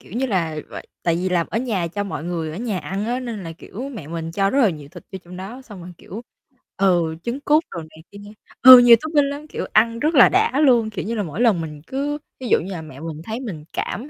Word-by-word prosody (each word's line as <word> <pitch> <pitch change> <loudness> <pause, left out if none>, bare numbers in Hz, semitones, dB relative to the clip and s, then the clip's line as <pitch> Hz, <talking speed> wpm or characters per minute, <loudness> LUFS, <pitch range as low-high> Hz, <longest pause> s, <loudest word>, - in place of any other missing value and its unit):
kiểu - - -17
như 260 +3 -1
là 170 -8 -1
v - - -12 0.3
tại 170 -1 +1
vì 185 +2 -1
là 175 -2 +1
ở 225 - -1
nhà 220 -8 -2
cho 205 +4 -4
mọi 190 -5 -5
người 165 -2 -3
ở 160 - -7
nhà 220 -5 -2
ăn 195 +4 -4
á, 245 +2 -2
nên 230 -6 -6
là, 165 - -6
kiểu, 225 +9 -8
mẹ 220 - -9
mình 165 0 -5
cho 195 +2 +1
rất 275 - +2
là 220 -7 +4
nhiều 150 -3 -9
thịt 175 +3 -13
vô 190 - -5
trong 180 +1 -11
đó, 220 +8 -8
xong 205 -7 -12
rồi, 180 +1 -10
kiểu, 215 +6 -9 0.6
ừ, 175 -4 +2
trứng 240 +4 -3
cút 300 +3 +3
đồ 170 - -5
này 160 0 -13
kia 200 - -12 0.4
ừ, 255 0 +12
nhiều 240 -1 +8
topping 300 -3 +1
lắm, 290 +2 -7
kiểu, - - -5
ăn 230 +1 +3
rất 305 +4 0
là 250 - +8
đã 395 -5 +2
luôn. 240 -6 +4
Kiểu 210 - -5
như 230 +3 -3
là 210 - -1
mỗi 170 +6 -5
lần 220 -8 +3
mình 150 -2 -7
cứ 285 +2 -2 0.2
ví 255 - -6
dụ - - +4
như 185 +4 -7
là 175 -4 -5
mẹ 155 -4 -11
mình 160 0 -7
thấy 220 +4 -5
mình 190 - -7
cảm, 245 +11 -4
200 Hz, 275 wpm, -21 LUFS, 170-250 Hz, 0.6 s, ừ